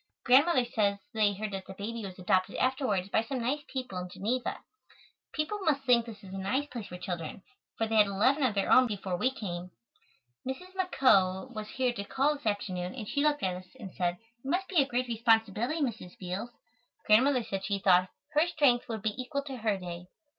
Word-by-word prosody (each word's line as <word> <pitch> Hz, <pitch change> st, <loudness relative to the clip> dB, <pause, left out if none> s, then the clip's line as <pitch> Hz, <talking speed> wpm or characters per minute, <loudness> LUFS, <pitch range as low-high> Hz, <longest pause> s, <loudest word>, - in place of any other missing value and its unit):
Grandmother 260 Hz, +1 st, +5 dB
says 205 Hz, -4 st, +1 dB, 0.2 s
they 215 Hz, -2 st, +3 dB
heard 210 Hz, +1 st, -4 dB
that 190 Hz, -1 st, -5 dB
the 190 Hz, -, -8 dB
baby 225 Hz, +3 st, -5 dB
was 190 Hz, -2 st, -7 dB
adopted 185 Hz, 0 st, +1 dB
afterwards 255 Hz, -8 st, 0 dB
by 220 Hz, -, +3 dB
some 255 Hz, +4 st, -4 dB
nice 255 Hz, +5 st, 0 dB
people 255 Hz, -8 st, -4 dB
in 180 Hz, 0 st, -6 dB
Geneva. 240 Hz, +7 st, -2 dB, 0.7 s
People 315 Hz, +7 st, -2 dB
must 305 Hz, -7 st, +1 dB
think 240 Hz, -3 st, +4 dB
this 215 Hz, -3 st, -10 dB
is 190 Hz, -1 st, -10 dB
a 195 Hz, -, -4 dB
nice 230 Hz, +10 st, 0 dB
place 240 Hz, -7 st, -7 dB
for 180 Hz, -, -8 dB
children, 180 Hz, 0 st, -5 dB, 0.3 s
for 225 Hz, -, +1 dB
they 220 Hz, 0 st, 0 dB
had 210 Hz, -1 st, +7 dB
eleven 230 Hz, +9 st, +2 dB
of 250 Hz, -6 st, +2 dB
their 195 Hz, -, +1 dB
own 255 Hz, 0 st, +7 dB
before 195 Hz, -4 st, -3 dB
we 250 Hz, +9 st, +2 dB
came. 180 Hz, -8 st, -5 dB, 0.7 s
Mrs. 310 Hz, +9 st, -6 dB
McCoe 255 Hz, -, +3 dB
was 215 Hz, -1 st, -6 dB
here 255 Hz, -2 st, 0 dB
to 200 Hz, -, -4 dB
call 270 Hz, +7 st, +1 dB
this 285 Hz, -5 st, -7 dB
afternoon 185 Hz, -3 st, -2 dB
and 225 Hz, -5 st, -6 dB
she 285 Hz, -, 0 dB
looked 295 Hz, 0 st, +2 dB
at 185 Hz, -1 st, 0 dB
us 185 Hz, 0 st, -11 dB
and 195 Hz, -6 st, -8 dB
said: 175 Hz, -1 st, -1 dB, 0.3 s
"It 270 Hz, -, -5 dB
must 375 Hz, +5 st, 0 dB
be 345 Hz, -6 st, +4 dB
a 270 Hz, -, +1 dB
great 250 Hz, 0 st, -1 dB
responsibility, 225 Hz, +4 st, +2 dB
Mrs. 225 Hz, -9 st, -3 dB
Beals." 185 Hz, +5 st, -4 dB, 0.6 s
Grandmother 250 Hz, +4 st, +5 dB
said 195 Hz, -3 st, -4 dB
she 200 Hz, 0 st, 0 dB
thought 185 Hz, -1 st, +4 dB, 0.2 s
"her 305 Hz, +4 st, +3 dB
strength 285 Hz, -9 st, +2 dB
would 220 Hz, -3 st, -4 dB
be 215 Hz, -, 0 dB
equal 280 Hz, +3 st, -3 dB
to 270 Hz, -2 st, -6 dB
her 215 Hz, -3 st, 0 dB
day." 175 Hz, -1 st, -7 dB
225 Hz, 210 wpm, -30 LUFS, 195-265 Hz, 0.7 s, had